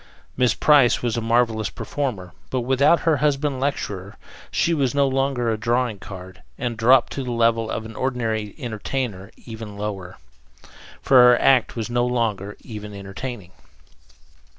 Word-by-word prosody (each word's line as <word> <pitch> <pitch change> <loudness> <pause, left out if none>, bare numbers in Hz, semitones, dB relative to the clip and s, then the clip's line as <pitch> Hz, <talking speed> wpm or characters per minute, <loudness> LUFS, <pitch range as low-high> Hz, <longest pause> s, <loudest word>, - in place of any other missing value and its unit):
Miss 125 -3 +2
Price 140 -6 +4
was 120 -2 0
a 115 - -1
marvelous 115 -1 +1
performer, 105 -11 -4 0.2
but 130 - -1
without 135 +6 +3
her 160 -3 +2
husband 145 -1 0
lecturer 100 -8 -3 0.3
she 170 - +1
was 140 -4 0
no 140 -1 +3
longer 135 -3 0
a 110 - -2
drawing 120 -1 0
card, 95 -1 -10 0.2
and 120 -2 -3
dropped 120 +3 +4
to 135 - -4
the 125 - -5
level 115 -1 +1
of 110 - -4
an 110 0 -9
ordinary 115 -5 -2
entertainer 110 -4 -4 0.2
even 110 -3 -8
lower, 100 -3 -5 0.9
for 135 - +5
her 125 -1 +7
act 130 -3 +3
was 115 -2 -3
no 120 0 +1
longer 110 -5 -1
even 105 -2 -8
entertaining. 100 0 -7
120 Hz, 150 wpm, -22 LUFS, 105-130 Hz, 0.9 s, her